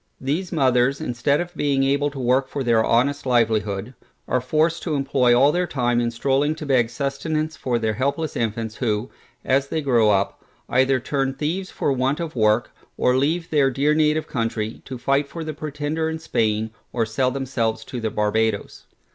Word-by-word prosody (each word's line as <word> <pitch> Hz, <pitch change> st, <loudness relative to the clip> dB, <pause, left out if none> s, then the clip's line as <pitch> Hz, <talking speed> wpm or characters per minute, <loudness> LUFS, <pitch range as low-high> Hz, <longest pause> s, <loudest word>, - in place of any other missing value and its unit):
These 155 Hz, +7 st, -2 dB
mothers, 135 Hz, -3 st, +2 dB
instead 125 Hz, +4 st, 0 dB
of 175 Hz, 0 st, -4 dB
being 140 Hz, -2 st, +1 dB
able 140 Hz, +2 st, +2 dB
to 145 Hz, -, -11 dB
work 130 Hz, +1 st, +2 dB
for 140 Hz, 0 st, -4 dB
their 115 Hz, -2 st, +3 dB
honest 135 Hz, +6 st, +2 dB
livelihood, 110 Hz, -2 st, +1 dB, 0.3 s
are 125 Hz, -, +1 dB
forced 155 Hz, +6 st, +1 dB
to 160 Hz, -4 st, -2 dB
employ 135 Hz, -3 st, +3 dB
all 140 Hz, +3 st, +5 dB
their 180 Hz, +2 st, 0 dB
time 120 Hz, -4 st, +1 dB
in 120 Hz, -, 0 dB
stroling 135 Hz, +5 st, 0 dB
to 155 Hz, -, -7 dB
beg 125 Hz, -5 st, +2 dB
sustenance 155 Hz, +4 st, -2 dB
for 125 Hz, -2 st, -1 dB
their 110 Hz, -2 st, 0 dB
helpless 140 Hz, +6 st, -1 dB
infants 110 Hz, -1 st, -2 dB
who, 110 Hz, -1 st, -1 dB, 0.3 s
as 135 Hz, +1 st, +2 dB
they 160 Hz, -, -2 dB
grow 120 Hz, -7 st, +3 dB
up, 100 Hz, -1 st, 0 dB, 0.2 s
either 130 Hz, +1 st, +3 dB
turn 135 Hz, +1 st, -1 dB
thieves 175 Hz, +7 st, -2 dB
for 140 Hz, -, -1 dB
want 135 Hz, +3 st, 0 dB
of 165 Hz, -4 st, -4 dB
work, 110 Hz, +1 st, +2 dB, 0.3 s
or 125 Hz, -, +2 dB
leave 160 Hz, +6 st, 0 dB
their 145 Hz, -3 st, +4 dB
dear 140 Hz, +4 st, +1 dB
native 155 Hz, 0 st, +2 dB
country, 115 Hz, -3 st, -3 dB
to 130 Hz, -, -6 dB
fight 140 Hz, +3 st, +1 dB
for 165 Hz, +3 st, -6 dB
the 155 Hz, 0 st, -4 dB
Pretender 150 Hz, +2 st, -3 dB
in 160 Hz, -, -3 dB
Spain, 110 Hz, -7 st, -1 dB, 0.2 s
or 115 Hz, -2 st, 0 dB
sell 125 Hz, +4 st, 0 dB
themselves 120 Hz, -4 st, -2 dB
to 125 Hz, -, -6 dB
the 110 Hz, -, -1 dB
Barbadoes. 105 Hz, 0 st, -1 dB
135 Hz, 185 wpm, -22 LUFS, 115-145 Hz, 0.3 s, all